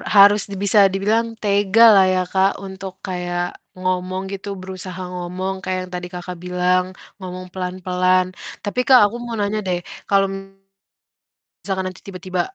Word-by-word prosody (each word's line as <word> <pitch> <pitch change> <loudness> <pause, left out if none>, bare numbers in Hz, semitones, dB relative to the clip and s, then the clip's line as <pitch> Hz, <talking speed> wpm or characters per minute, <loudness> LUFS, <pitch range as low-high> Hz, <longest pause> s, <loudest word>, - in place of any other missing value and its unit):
harus 205 +1 +8
di - - -4
bisa 205 +1 +4
dibilang 225 +4 0
tegalah 205 0 +6
ya 185 - +2
Kak, 190 +1 +3
untuk 190 -1 -7
kayak 175 -1 -3 0.2
ngomong 185 0 -1
gitu. 195 +1 -6
Berusaha 185 0 -7
ngomong 180 +2 -3
kayak 185 0 -1
yang 180 - -11
tadi 180 0 -5
Kakak 180 0 -6
bilang 180 0 +2 0.3
ngomong 185 -1 -7
pelan-pelan. 185 0 +1 0.4
Tapi 205 +4 -3
Kak, 260 -2 +8
aku 205 +3 -2
mau 235 -1 -4
nanya 205 +1 0
deh, 180 -1 0 0.3
kalo 195 -1 +4 1.4
misalkan 190 -1 -2
nanti 185 - -14
tiba-tiba 185 -1 -4
185 Hz, 145 wpm, -20 LUFS, 180-200 Hz, 1.4 s, harus